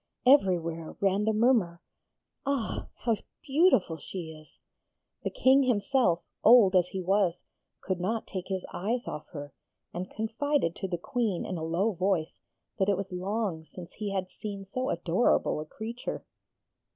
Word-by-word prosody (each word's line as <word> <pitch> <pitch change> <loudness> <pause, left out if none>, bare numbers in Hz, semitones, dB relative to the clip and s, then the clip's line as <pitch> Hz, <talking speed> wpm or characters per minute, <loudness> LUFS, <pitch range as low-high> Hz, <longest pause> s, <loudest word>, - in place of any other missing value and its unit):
Everywhere 170 - +3
ran 200 +1 +2
the 220 - +3
murmur, 215 -6 +2 0.6
'Ah! 275 -5 -2 0.2
how 230 -3 +3 0.3
beautiful 275 - +3
she 170 -1 -7
is!' 155 -1 -15 0.6
The - - -2
King 265 +2 +4
himself, 245 -6 +2 0.2
old 215 -5 +7
as 180 -1 +5
he 190 0 -4
was, 190 -1 +1 0.4
could 185 -2 -2
not 215 +5 -1
take 185 -2 -6
his 190 -2 -3
eyes 235 +6 -2
off 150 - -6
her, 145 -2 -8 0.4
and 180 +2 -4
confided 225 - -1
to 190 - -3
the 175 -2 -2
Queen 215 0 -1
in 185 -3 -4
a - - -4
low 175 +7 +1
voice 185 -3 -1 0.4
that 190 +1 +3
it 200 - +3
was 195 -1 -5
long 185 -2 -2
since 175 +2 -11
he 210 -1 -4
had 190 -1 -1
seen 200 -2 -6
so 255 +7 -3
adorable 170 +1 +2
a 155 - -5
creature. 225 +9 -6
195 Hz, 155 wpm, -29 LUFS, 175-230 Hz, 0.6 s, old